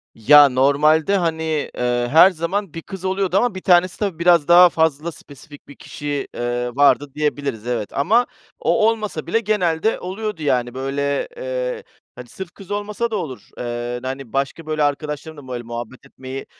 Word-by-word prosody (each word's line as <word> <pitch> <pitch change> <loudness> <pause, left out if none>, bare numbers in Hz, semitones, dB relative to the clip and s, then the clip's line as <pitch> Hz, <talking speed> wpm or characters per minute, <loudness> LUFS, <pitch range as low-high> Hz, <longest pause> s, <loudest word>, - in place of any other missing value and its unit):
Ya, 145 +5 +7
normalde, 150 +7 +3
hani, 160 -2 -1 0.3
eee, 120 0 0
her 170 +5 +7
zaman 180 +2 -3
bir 165 - -6
kız 190 +1 -9
oluyordu 190 0 0
ama 235 -3 +1
bir 185 - -6
tanesi 180 -1 +3
tabii 195 -6 -2
biraz 170 -3 +4
daha 175 +1 +8
fazla 160 0 0
spesifik 145 -1 -15
bir 145 - -13
kişi, 145 -1 -5
eee, 120 0 -2
vardı 145 0 +3
diyebiliriz, 145 -6 -2
evet 120 -4 -2
ama 225 - +3 0.3
o 215 - +2
olmasa 210 -9 -4
bile 225 - +2
genelde 205 -3 0
oluyordu. 195 -1 -5
Yani, 125 -4 0
böyle, 140 +2 -2
eee, - - -4 0.3
hani, - - -10
sırf 190 -4 -8
kız 195 -1 -14
olmasa 210 +3 -2
da - - -1
olur, 135 -10 -6
eee, 120 0 -4
hani 130 -2 -6
başka 140 +4 -2
böyle 155 -1 -1
arkadaşlarım 150 +1 -3
da 135 -2 -12
böyle 120 -1 -5
muhabbet 120 +3 -8
etmeyi 135 0 -8
155 Hz, 170 wpm, -20 LUFS, 135-190 Hz, 0.3 s, daha